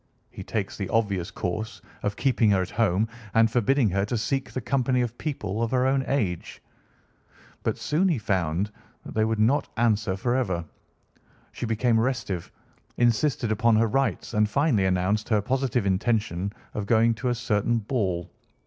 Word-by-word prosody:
He -, -, -8 dB
takes -, -, -3 dB
the -, -, -3 dB
obvious 100 Hz, -6 st, 0 dB
course 105 Hz, +5 st, -4 dB, 0.2 s
of 105 Hz, 0 st, -2 dB
keeping 120 Hz, -4 st, +2 dB
her 95 Hz, -2 st, +3 dB
at 90 Hz, -, -8 dB
home 110 Hz, -1 st, +2 dB, 0.3 s
and 115 Hz, 0 st, +5 dB
forbidding 125 Hz, +2 st, +3 dB
her 100 Hz, +1 st, +1 dB
to 120 Hz, +3 st, -2 dB
seek 135 Hz, +4 st, -1 dB
the -, -, -3 dB
company 130 Hz, +1 st, +1 dB
of 120 Hz, -1 st, -2 dB
people 110 Hz, -9 st, -3 dB
of 115 Hz, -, 0 dB
her 125 Hz, +1 st, +2 dB
own 135 Hz, 0 st, +2 dB
age. 100 Hz, -12 st, -2 dB, 1.0 s
But -, -, -1 dB
soon 170 Hz, +6 st, +1 dB
he 160 Hz, -, +1 dB
found 95 Hz, -2 st, -1 dB, 0.3 s
that -, -, -8 dB
that 110 Hz, 0 st, +2 dB
would 110 Hz, 0 st, 0 dB
not 115 Hz, +7 st, +2 dB
answer 110 Hz, -4 st, +1 dB
forever. 105 Hz, -7 st, 0 dB, 0.9 s
She 120 Hz, -, -5 dB
became 115 Hz, +1 st, +2 dB
restive, 110 Hz, -8 st, -2 dB, 0.5 s
insisted 120 Hz, 0 st, +2 dB
upon 110 Hz, +1 st, +3 dB
her 110 Hz, +1 st, +4 dB
rights, 135 Hz, +2 st, -1 dB
and 105 Hz, -1 st, +2 dB
finally 130 Hz, -6 st, +2 dB
announced 95 Hz, +3 st, 0 dB
her 110 Hz, -2 st, +3 dB
positive 125 Hz, 0 st, 0 dB
intention 100 Hz, -2 st, 0 dB, 0.2 s
of 105 Hz, -1 st, -4 dB
going 115 Hz, +1 st, +4 dB
to 115 Hz, +3 st, -2 dB
a 120 Hz, -, +1 dB
certain 115 Hz, -1 st, 0 dB
ball. 100 Hz, -7 st, -2 dB
110 Hz, 165 wpm, -26 LUFS, 100-125 Hz, 1.0 s, and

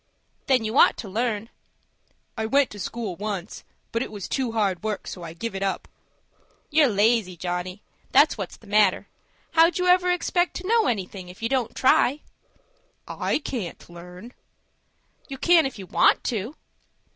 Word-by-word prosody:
"Then 255 Hz, -4 st, +3 dB
you 220 Hz, +4 st, 0 dB
ought -, -, +6 dB
to 220 Hz, -, -7 dB
learn." 225 Hz, +1 st, -2 dB, 0.9 s
"I 220 Hz, -1 st, -2 dB
went 275 Hz, +3 st, +3 dB
to 205 Hz, -, -9 dB
school 215 Hz, -1 st, -4 dB
once; 205 Hz, -2 st, -5 dB, 0.3 s
but 230 Hz, -, -1 dB
it -, -, -4 dB
was 205 Hz, -3 st, -6 dB
too 255 Hz, -4 st, -2 dB
hard 200 Hz, -5 st, 0 dB
work, 215 Hz, -1 st, -3 dB
so 180 Hz, -, -7 dB
I 165 Hz, -1 st, -7 dB
give 230 Hz, +6 st, -5 dB
it 195 Hz, -, -5 dB
up." 195 Hz, -2 st, -2 dB, 0.8 s
"You're 300 Hz, -1 st, +5 dB
lazy, 210 Hz, -3 st, +2 dB
Johnny,—that's 185 Hz, -, 0 dB
what's 195 Hz, -5 st, -6 dB
the -, -, -20 dB
matter. 205 Hz, -2 st, +2 dB, 0.4 s
How'd 330 Hz, +1 st, +4 dB
you 360 Hz, -, 0 dB
ever 360 Hz, 0 st, +4 dB
expect 355 Hz, 0 st, 0 dB
to 365 Hz, -, -5 dB
know 455 Hz, 0 st, +3 dB
anything, 190 Hz, -4 st, -3 dB
if 185 Hz, +5 st, -12 dB
you 230 Hz, -, 0 dB
don't 255 Hz, -4 st, -1 dB
try?" 265 Hz, +2 st, +3 dB, 0.9 s
"I -, -, -1 dB
can't 240 Hz, -, -6 dB
learn." 180 Hz, +7 st, -11 dB, 0.9 s
"You 270 Hz, -, -7 dB
can, 335 Hz, 0 st, +4 dB
if 265 Hz, -, -9 dB
you 195 Hz, -, -8 dB
want -, -, +3 dB
to." 230 Hz, +5 st, -3 dB
220 Hz, 165 wpm, -24 LUFS, 195-270 Hz, 0.9 s, ought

